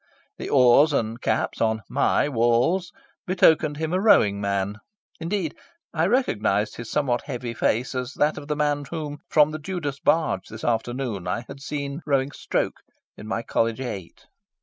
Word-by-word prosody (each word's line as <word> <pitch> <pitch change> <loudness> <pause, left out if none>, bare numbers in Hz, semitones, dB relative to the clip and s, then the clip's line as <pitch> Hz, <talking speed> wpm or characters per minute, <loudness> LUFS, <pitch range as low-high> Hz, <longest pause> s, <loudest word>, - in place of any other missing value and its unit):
The - - -5
oars 135 +3 +5
and 115 -2 -1
caps 110 - -1
on 110 -1 +1
my - - +2
walls 125 +9 +2 0.4
betokened 160 -5 +4
him 160 +2 -2
a 185 - +1
rowing 105 - +4
man. 100 0 -1 0.4
Indeed, 170 -1 -2 0.4
I 165 +1 +2
recognised 105 - +1
his 115 -1 -7
somewhat 130 -5 0
heavy 125 -4 -4
face 115 +3 0
as 125 +1 -3
that 150 +1 +1
of 145 - -11
the 150 - -1
man 145 -1 0
whom, 150 -3 -5
from 150 -1 +5
the 155 - -5
Judas 150 -4 -4
barge 155 - +1
this 110 0 -9
afternoon, 120 -3 -2
I 115 - -1
had 135 0 -10
seen 140 +1 -4
rowing 140 -1 +1
"stroke" - - -2 0.4
in 105 - -10
my 115 +1 -2
College 115 +1 0
Eight. 100 -9 -7
140 Hz, 165 wpm, -24 LUFS, 115-155 Hz, 0.4 s, oars